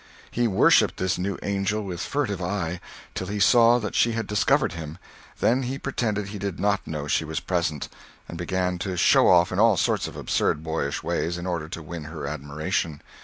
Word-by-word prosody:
He 120 0 +1
worshipped 95 - +4
this 95 0 -1
new 100 +2 -2
angel 100 +2 -1
with 90 -3 -5
furtive 125 -10 -2
eye, 90 -1 -2 0.3
till 95 - -4
he 105 +2 -3
saw 115 +4 +6
that 105 -4 -4
she 115 - +3
had 115 0 -2
discovered 135 +6 +2
him; 80 -1 -7 0.4
then 125 +3 +3
he 130 +1 -3
pretended 110 -7 -2
he 105 0 -6
did 100 -2 -4
not 100 +1 0
know 75 -2 -4
she 75 - +1
was 80 0 -3
present, 85 -5 -2 0.4
and - - -8
began 90 +1 -1
to 95 0 -3
"show - - +5
off" 85 -1 +5
in 95 - -1
all 110 -3 +5
sorts - - +1
of - - -9
absurd 75 - 0
boyish 80 -3 -2
ways, 85 +1 -1
in 85 - -6
order 85 -4 -3
to 85 - -7
win 80 0 -7
her 80 -2 -6
admiration. 75 +2 -3
95 Hz, 200 wpm, -25 LUFS, 80-105 Hz, 0.4 s, saw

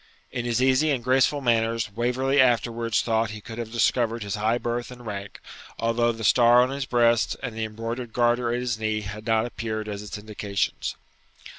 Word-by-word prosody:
In 120 -1 -3
his 120 +1 +1
easy 135 +4 +3
and 130 -5 0
graceful 130 +3 +2
manners 115 -3 +1
Waverley 125 +5 +1
afterwards 115 -2 +1
thought 115 -1 +1
he 105 0 -7
could 115 +2 -9
have 115 -2 -5
discovered 115 0 +1
his 100 -1 -4
high 110 +2 +1
birth 120 0 -3
and 125 -1 -11
rank, 100 -2 -6 0.4
although 115 +1 +1
the 115 -1 -7
star 120 +3 +6
on 130 - -1
his 140 -1 -3
breast 120 -1 +3
and 125 -4 -4
the 110 0 -2
embroidered 115 +2 -5
garter 120 0 +2
at 120 - 0
his 120 -3 -2
knee 110 -1 -1
had 105 +2 -8
not 110 0 +2
appeared 110 -2 -4
as 100 -1 -5
its 105 0 -7
indications. 105 -2 -3
115 Hz, 190 wpm, -25 LUFS, 110-120 Hz, 0.4 s, star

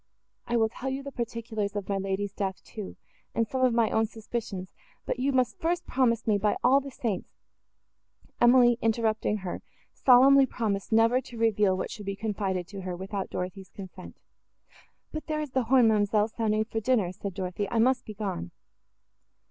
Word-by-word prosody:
I 240 - +1
will 225 -1 +3
tell 260 +4 -5
you 270 +1 -3
the 280 - -7
particulars 230 -4 -4
of 205 -2 -3
my 195 -1 -1
lady's 195 +1 -2
death, 190 -2 -3
too, 210 -4 -8 0.4
and 230 -1 +1
some 260 +3 -2
of 255 - +5
my 230 -1 +2
own 220 0 +2
suspicions; 215 -4 -6 0.3
but 245 - -2
you 270 +2 +1
must 255 -2 +1
first 345 +1 -1
promise 235 -3 +1
me 210 -2 +2
by 210 +1 +1
all 260 +3 +6
the 275 - -7
saints—" 230 -7 -3 1.1
Emily, 240 0 +6
interrupting 220 -1 +1
her, 175 - -4 0.3
solemnly 270 +2 +6
promised 205 -5 -2
never 230 +3 +4
to 240 -2 -11
reveal 210 -4 +2
what - - -4
should 205 -3 -8
be 200 - -2
confided 195 -3 -2
to 200 0 -7
her, 185 -1 -4
without 190 +2 -4
Dorothée's 185 +1 -5
consent. 185 -2 -10 0.9
"But 310 -1 -6
there 310 -1 -1
is 300 -3 -4
the 260 -2 0
horn, 250 -1 +5
ma'amselle, 210 0 +2
sounding 215 -1 0
for 225 0 -3
dinner," 220 -6 +1
said 190 0 -6
Dorothée; 185 +2 -3
"I 230 - -1
must 250 +2 +3
be 215 - -9
gone." 195 - -4
220 Hz, 180 wpm, -28 LUFS, 200-245 Hz, 1.1 s, all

